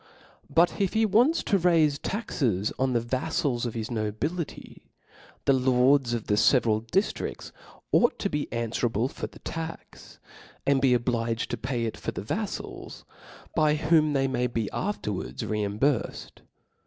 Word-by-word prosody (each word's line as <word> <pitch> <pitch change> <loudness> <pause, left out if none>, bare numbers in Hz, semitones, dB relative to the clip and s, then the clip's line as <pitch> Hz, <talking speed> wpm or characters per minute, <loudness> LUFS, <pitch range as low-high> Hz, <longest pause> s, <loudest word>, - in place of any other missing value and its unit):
But 170 +4 +3
if 195 - +1
he 220 0 +3
wants 245 - +3
to 200 - +2
raife 160 -5 +3
ta3^s 120 - -1
on 130 -1 +1
the 120 - +3
vali&ls 120 +1 -1
of 120 - -6
his 115 +1 -4
nobility, 115 +10 -4 0.6
the 135 - +5
lords 130 0 +3
of 115 - -4
the 105 - +1
feveral 110 -3 +4
diftrifls 195 - -1 0.4
ought 240 - +4
to - - -1
be 150 -6 -3
an 115 -1 -2
fwerable 115 +1 0
for - - -5
the - - -15
tax 165 0 -8 0.2
+, - - -21
and 140 -1 +3
be 130 -2 +4
obliged 115 -1 -1
to - - 0
pay 125 -3 -2
it 110 - -4
for - - -4
the - - -5
vaflals, - - -5 0.5
by 150 -1 +3
whom 155 -1 +3
they 135 -1 +2
may 125 -1 0
be 115 -3 -3
afterwards 145 - -3
re 105 0 -1
imburfcfd. 110 +6 -1
130 Hz, 160 wpm, -27 LUFS, 115-155 Hz, 0.6 s, the